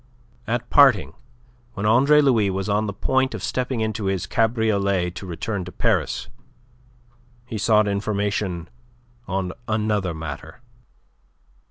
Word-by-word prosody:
At 120 +1 -2
parting, 135 -9 +5 0.6
when 105 -2 -4
Andre 140 +7 +5
Louis 115 -8 +3
was 95 +1 -2
on 105 +1 +1
the - - -2
point 130 +5 0
of 105 - -7
stepping 125 -2 -2
into 110 -1 -2
his 95 -2 -1
cabriolet 100 -5 +1
to 95 +2 -8
return 95 +3 -3
to 90 - -8
Paris, - - 0 1.2
he 115 -4 -5
sought 105 +1 +3
information 100 -3 -2 0.6
on 95 -1 -2
another 105 -5 0
matter. 80 - -7
105 Hz, 125 wpm, -23 LUFS, 95-115 Hz, 1.2 s, parting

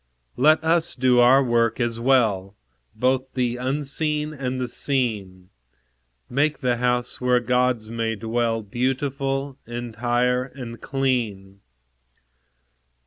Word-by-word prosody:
Let 155 +4 +4
us 165 +1 +2
do 125 -1 +3
our 130 +3 +6
work 120 -1 +1
as 120 -1 -1
well, 110 -7 +2 0.4
Both 130 +1 0
the 125 -1 0
unseen 150 +3 -1
and 130 -2 -3
the 125 - -2
seen; 105 -8 -2 0.8
Make 145 +4 +1
the 125 -2 +1
house, 125 0 -1
where 125 0 +3
Gods 125 -2 0
may 115 -1 -2
dwell, 115 +1 -1
Beautiful, 135 +4 -2
entire, 120 +1 -1
and 125 -3 -9
clean. 115 -8 -2
125 Hz, 110 wpm, -23 LUFS, 115-135 Hz, 0.8 s, our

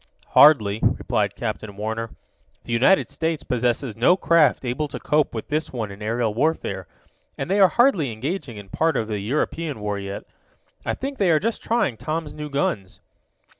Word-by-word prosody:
"Hardly," 110 -9 +6
replied - - 0
Captain 100 -2 -5
Warner. 110 +2 -3 0.5
"The 115 - -4
United 135 +12 +3
States 160 -2 -2
possesses 125 -1 -1
no 125 +11 +4
craft 165 -7 +3
able 125 +5 -1
to 140 - -7
cope 150 -4 +1
with 110 - -5
this 155 +2 -1
one 110 -5 -4
in 100 +2 -11
aerial 115 0 -1
warfare, 110 - -1 0.5
and - - -4
they 200 - +2
are 195 - +8
hardly 200 - +3
engaging 125 - -4
in 100 -1 -10
part 160 +3 +1
of 110 - -1
the 105 -2 -3
European 145 +5 -2
war 105 -1 -3
yet. 100 0 -6 0.6
I - - -2
think 275 +1 -5
they 195 -3 +3
are 155 -2 +4
just 225 +5 -2
trying 225 - 0
Tom's 155 +2 -4
new 150 0 -6
guns." 105 -9 -2
130 Hz, 175 wpm, -23 LUFS, 110-160 Hz, 0.6 s, are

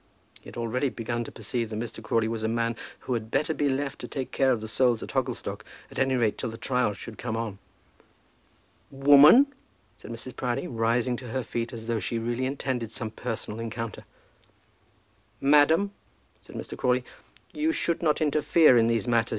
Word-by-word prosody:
He - - -17
had - - -10
already 120 +4 0
begun 120 0 -3
to - - -8
perceive 115 +1 -3
that 110 - -5
Mr. 115 0 -5
Crawley 110 0 +1
was 115 0 -3
a 110 - 0
man 115 0 0 0.3
who 130 - -3
had 110 -2 -3
better 155 +6 +1
be 145 -2 0
left 135 +1 -2
to - - -6
take 135 -2 -4
care 135 -1 +3
of 120 - +1
the 110 - -6
souls 120 +1 +2
at - - -7
Hogglestock, 120 -5 -2 0.3
at - - -5
any 135 0 +2
rate 115 -4 +1
till 125 - -2
the 115 - -8
trial 125 -5 0
should 110 +3 -9
come 115 -2 -3
on. 110 -4 -4 1.3
"Woman!" 145 - +7 0.4
said - - -12
Mrs. 115 +2 -6
Proudie, 125 +4 -2
rising 120 0 0
to 125 - -8
her 130 +2 -2
feet 115 0 -3
as 115 -2 -7
though 115 -1 -1
she 110 +4 -2
really 120 +3 -1
intended 130 -4 -2
some 110 -1 -4
personal 110 -1 -4
encounter. 115 -1 -5 1.4
"Madam," 150 +7 +4 0.5
said - - -14
Mr. - - -6
Crawley, 125 0 +1 0.5
"you 310 +2 +1
should 170 - +1
not 155 -2 +1
interfere 150 -2 +5
in 115 - +3
these 115 0 +1
matters. 115 -1 +2
120 Hz, 190 wpm, -27 LUFS, 115-135 Hz, 1.4 s, Woman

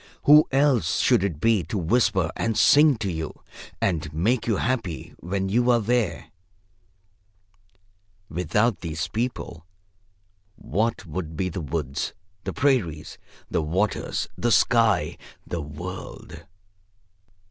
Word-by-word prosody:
Who 150 +1 +7
else 135 - +2
should - - +3
it 85 -7 -2
be 115 +1 +3
to 100 - -3
whisper 95 -2 +1
and 115 -2 -1
sing 150 -1 +6
to 100 -4 -2
you 80 -2 -6 0.4
and 80 -5 -1
make 110 +12 0
you 110 - +2
happy 115 -8 -2
when 95 +2 -2
you 120 +5 +2
are 120 -1 +5
there? 115 -2 -1 2.0
Without 90 +7 0
these 80 -1 -3
people, 115 -8 -4 0.9
what 110 0 -2
would 80 -1 -5
be 90 +2 -1
the 90 +1 -5
woods, 75 -1 -3 0.3
the 95 - -2
prairies, 95 - 0 0.3
the - - +1
waters, 90 +8 -1
the 120 - 0
sky, 115 -2 +3 0.3
the 85 - -4
world? 80 +1 -8
95 Hz, 120 wpm, -24 LUFS, 80-115 Hz, 2.0 s, Who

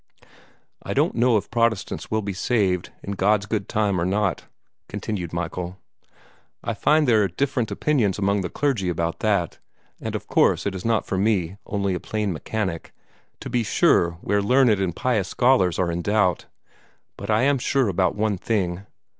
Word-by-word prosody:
"I - - -5
don't - - +2
know 120 -1 +3
if 100 - -5
Protestants 115 -4 0
will 110 0 0
be 100 0 -3
saved, 95 -3 0
in 100 - -5
God's 100 +1 +2
good 105 -1 -3
time, 105 -5 +1
or - - +1
not," 95 +1 0 0.4
continued 90 -6 -4
Michael. 85 +2 -4 0.9
"I - - -2
find 155 -1 +2
there 110 -3 +4
are 100 - +2
different 130 -1 -1
opinions 120 -11 +1
among 100 0 +1
the 90 - -3
clergy 120 -9 0
about 85 -1 -2
that, 100 -6 0 0.4
and - - -4
of - - -4
course - - +2
it 100 - -1
is 95 - -6
not 115 -1 +1
for 95 - -2
me, 100 -3 0
only 100 -2 -1
a 90 - -2
plain 105 -1 -2
mechanic, 95 0 -4 0.5
to - - -6
be 120 -1 +1
sure 85 -5 +3
where 100 0 +1
learned 125 +4 +4
and 90 -3 -1
pious 110 -7 0
scholars 120 -9 +3
are 90 -2 0
in 85 +1 -2
doubt. 95 -3 +1 0.7
But - - -8
I 110 +3 +3
am 140 0 +3
sure 135 0 +1
about 95 -1 +1
one 105 -2 0
thing. 95 -3 -2
100 Hz, 180 wpm, -23 LUFS, 90-110 Hz, 0.9 s, there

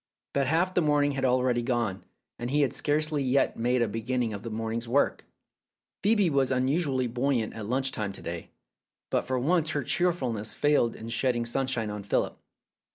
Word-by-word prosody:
But 140 -2 +1
half 170 +5 +2
the 180 - +3
morning 145 -2 +3
had 135 -1 -1
already 125 -1 +2
gone, 120 -6 -1 0.4
and 120 - -3
he 145 +3 +2
had 140 - +1
scarcely 150 0 +1
yet 135 +1 +2
made 120 +1 +1
a - - 0
beginning 115 +1 -2
of 100 - -6
the 115 - -6
morning's 115 +1 -3
work. 135 +5 +1 0.8
Phcebe 205 -4 +3
was 135 -2 +2
unusually 130 +1 +1
buoyant 120 -1 0
at 110 -2 -6
lunch 130 +2 +1
time 105 -4 -3
to - - -7
day, 85 0 -6 0.6
but - - +1
for 130 - -1
once 155 +4 +2
her 145 -3 -1
cheerfulness 125 -10 0
failed 145 -6 +2
in 115 - -8
shedding 120 0 +1
sunshine 120 -3 -1
on 105 0 -5
Philip. 100 - 0
130 Hz, 180 wpm, -28 LUFS, 115-145 Hz, 0.8 s, the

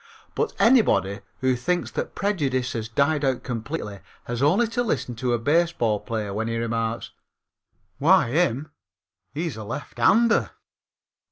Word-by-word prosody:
But 455 - -1
anybody 200 - +3 0.2
who 130 -1 +2
thinks 175 +8 -1
that - - -4
prejudice 140 -11 0
has 110 -1 -4
died 145 +5 +1
out 130 -2 0
completely 115 -4 -5 0.2
has 120 0 -4
only 175 +12 +4
to 230 +2 -1
listen 130 - -1
to 125 0 0
a - - +2
baseball 145 -5 +1
player 110 -4 -4
when 110 +2 -2
he 115 0 -2
remarks: 115 0 -2 0.9
"Why - - +5
him 150 -2 +1 0.6
he's 155 -3 -3
a - - -7
lefthander!" 175 - +2
130 Hz, 140 wpm, -24 LUFS, 115-170 Hz, 0.9 s, Why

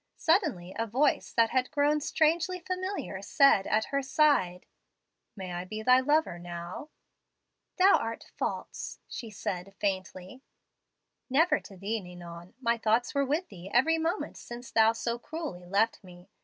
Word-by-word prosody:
Suddenly 305 - +1
a 230 - 0
voice 270 +7 +1
that 230 -1 +3
had 255 -1 +1
grown 295 0 +2
strangely 325 +5 +1
familiar 370 - -4
said 205 -1 +4
at 215 +1 +2
her 275 - +2
side, 265 - +2 0.7
'May 185 -3 -6
I 175 +1 -3
be 215 +4 -6
thy 255 +2 +6
lover 290 - +1
now?' 175 - -7 0.9
"'Thou 385 +2 +6
art 230 0 -5
false,' - - -4
she 230 - -7
said 195 -2 -5
faintly. 190 +3 -3 0.9
"'Never 300 +3 +3
to 195 - -13
thee, 210 +4 -2
Ninon. 175 0 -11
My 235 -2 +1
thoughts 225 +2 +1
were 280 0 +2
with 310 +7 -1
thee 185 -1 -10
every 320 +8 +3
moment 330 +5 -2
since 240 0 -9
thou 225 0 +5
so 235 +1 -3
cruelly 295 - -6
left 205 +5 +1
me. 180 -1 -15
230 Hz, 150 wpm, -29 LUFS, 190-300 Hz, 0.9 s, thy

